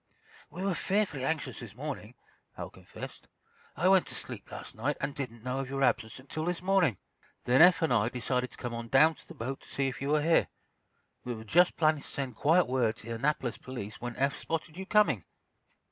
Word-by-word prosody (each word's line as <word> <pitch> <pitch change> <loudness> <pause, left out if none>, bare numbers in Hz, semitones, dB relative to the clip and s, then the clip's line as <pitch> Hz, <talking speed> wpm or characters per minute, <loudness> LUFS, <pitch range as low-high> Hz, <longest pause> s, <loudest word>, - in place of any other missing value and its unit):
"We 180 +5 -5
were 195 - +2
fearfully 185 -6 0
anxious 140 -3 -2
this 115 -4 -9
morning," 125 -4 -6 0.4
Hal - - -6
confessed. - - -10 0.5
"I 180 - +2
went 190 -1 +5
to - - -6
sleep - - -7
last - - -8
night, 140 +7 -1
and 145 - -2
didn't 120 -5 -6
know 130 +1 -2
of 135 -1 -4
your 135 0 -1
absence 110 -3 +1
until 150 +4 -4
this 175 0 -2
morning. 185 - +3 0.5
Then 125 +2 +4
Eph 175 -2 +7
and 160 - +3
I 110 -1 +3
decided 125 +1 -1
to - - -16
come 120 -1 -4
on 115 0 -5
down 150 +7 +6
to - - -17
the 170 - -11
boat 135 +1 -4
to - - -16
see 135 -1 0
if 130 - -8
you 140 - -1
were 150 0 +3
here. 165 +1 +4 0.8
We 125 -1 -3
were 110 - -8
just 175 +11 +4
planning 155 -2 +3
to - - -9
send 130 -4 -4
quiet 165 - +4
word 125 -3 +1
to 115 - -11
the - - -2
Annapolis 125 0 -1
police 120 -5 -7
when 120 0 -4
Eph 140 0 0
spotted 160 -1 -3
you 190 +1 -6
coming." 170 - +4
135 Hz, 220 wpm, -30 LUFS, 120-160 Hz, 0.8 s, Eph